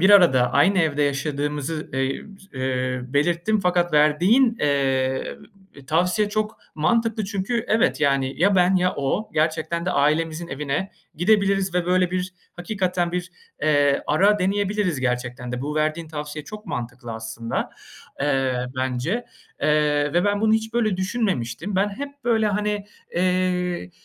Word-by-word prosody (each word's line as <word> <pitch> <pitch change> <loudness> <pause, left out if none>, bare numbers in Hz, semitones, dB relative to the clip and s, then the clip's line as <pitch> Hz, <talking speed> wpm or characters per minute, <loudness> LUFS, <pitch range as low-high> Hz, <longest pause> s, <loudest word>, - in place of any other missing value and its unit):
bir 190 +3 +5
arada 130 -11 +6
aynı 185 +7 +4
evde 150 -3 +2
yaşadığımızı, 145 +2 -2
eee, 135 0 -1 0.3
s 130 - -8
eee, 130 -1 -1
belirttim 170 +10 +1
fakat 175 -2 +1
verdiğin, 180 - +4
eee, 135 -2 0 0.5
tavsiye 180 +6 +1
çok 215 +1 -2 0.2
mantıklı 225 +6 +1
çünkü 210 +4 -2
evet, 220 +1 +2
yani 135 -2 +1
ya 200 +2 +4
ben 180 +1 +4
ya 180 0 +2
o 145 +10 -1
gerçekten 160 +2 0
de - - +1
ailemizin 160 +3 +1
evine 150 +7 -3 0.2
gidebiliriz 195 0 +2
ve 175 -1 0
böyle 180 0 +2
bir 185 0 -2 0.2
hakikaten 180 -2 -1
bir, 180 0 -3 0.3
eee, 145 -2 +3
ara 200 +7 +3
deneyebiliriz 200 -4 0
gerçekten 125 -1 -2
de. 125 - -3
Bu 150 +1 -3
verdiğin 155 +1 -1
tavsiye 150 -1 -6
çok 215 +3 -10
mantıklı 120 -1 -5
aslında, 110 +1 -4 0.5
eee, 135 -3 0
bence, 130 - -1 0.4
eee, 150 -1 +2
ve 175 +3 +2
ben 205 0 +1
bunu 220 0 +3
hiç 220 +1 0
böyle 215 -5 +1
düşünmemiştim. 185 - -2
Ben 195 +2 +2
hep 280 +6 -8
böyle, 225 -2 +2
hani, 210 0 -1 0.3
eee, 180 - 0
170 Hz, 140 wpm, -23 LUFS, 140-200 Hz, 0.5 s, arada